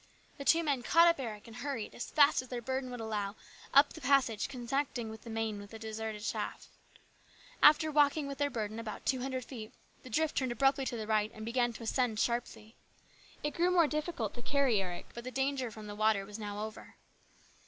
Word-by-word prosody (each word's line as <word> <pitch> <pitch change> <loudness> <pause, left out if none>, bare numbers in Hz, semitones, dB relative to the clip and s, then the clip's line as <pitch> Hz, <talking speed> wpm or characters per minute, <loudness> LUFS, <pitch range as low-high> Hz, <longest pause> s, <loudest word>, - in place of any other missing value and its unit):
The 280 - -5
two 335 +3 +5
men 285 -5 0
caught 335 +7 +6
up 335 -3 +3
Eric 220 -5 -5
and 230 -1 -11
hurried, 260 -5 -4
as 240 - -6
fast 290 -2 +5
as 255 - -12
their 245 -1 -4
burden 260 +2 -3
would 245 -1 -6
allow, 210 -2 -3 0.4
up 280 +1 +6
the 320 - -10
passage 255 -5 +3
connecting 250 -2 -2
the 220 +1 -12
main 225 -2 -2
with 205 0 -10
the 225 - -9
deserted 220 -1 -5
shaft. - - -4 0.9
After 310 +1 +7
walking 295 0 +3
with 280 0 -6
their 285 0 +2
burden 220 -3 -3
about 225 -2 -6
two 260 -2 +1
hundred 260 -1 -3
feet, 225 -4 -8 0.3
the 255 - -11
drift 310 +6 0
turned 260 -3 +1
abruptly 270 +2 +2
to 240 - -2
the 220 - -4
right 215 -1 +2
and 215 0 -7
began 240 +1 +1
to 230 - -9
ascend 230 -1 0
sharply. 235 -2 -2 0.7
It 295 - -1
grew 350 +2 +2
more 355 -2 +5
difficult 305 - -2
to 240 - -8
carry 265 -5 +2
Eric, 180 -2 -5
but 235 - -7
the 255 - -4
danger 265 0 -1
from 215 -1 -10
the 205 - -6
water 215 -1 +2
was 205 +2 -8
now 205 0 -4
over. 220 - -10
240 Hz, 210 wpm, -32 LUFS, 220-275 Hz, 0.9 s, After